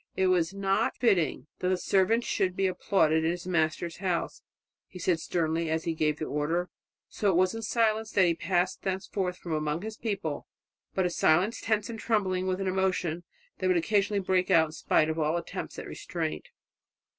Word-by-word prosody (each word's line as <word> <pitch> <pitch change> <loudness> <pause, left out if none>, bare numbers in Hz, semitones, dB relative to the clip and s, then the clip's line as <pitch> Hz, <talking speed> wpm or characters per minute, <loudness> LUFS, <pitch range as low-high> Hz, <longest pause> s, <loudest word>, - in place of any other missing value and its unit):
"It 190 -1 +2
is 175 -2 +2
not 195 0 0
fitting 200 -9 +2
that 180 - 0
the 185 - +2
servant 195 +6 +2
should 185 -5 0
be 195 - +1
applauded 160 -4 +2
in 160 - +2
his 175 0 -3
Master's 165 -1 0
house," 180 -4 -2 0.5
he - - -11
said 175 -1 +1
sternly 165 -1 -1
as 160 0 0
he 165 - -1
gave 155 -1 0
the 155 - -3
order. 165 +5 -1 0.4
So 205 - 0
it 190 - +2
was 185 +2 +3
in 225 - -5
silence 220 -1 +1
that 190 - +5
he 170 - +3
passed 180 +2 0
thenceforward 190 -1 -2
amongst 155 0 -1
his 220 0 -6
people 210 -3 -3 0.5
but 190 - +2
a 180 - 0
silence 180 +8 +2
tense 215 -2 0
and 225 -1 -6
trembling 190 -5 0
with 185 0 -1
an 195 - -2
emotion 185 -3 0 0.3
that 185 - 0
would 185 -1 +3
occasionally 200 +3 +1
break 185 0 +1
out 160 -4 +5
in - - -10
spite 155 0 +2
of 160 +1 -2
all 155 +2 +1
attempts 170 - -6
at - - -6
restraint. 75 -1 -4
185 Hz, 190 wpm, -28 LUFS, 165-195 Hz, 0.5 s, that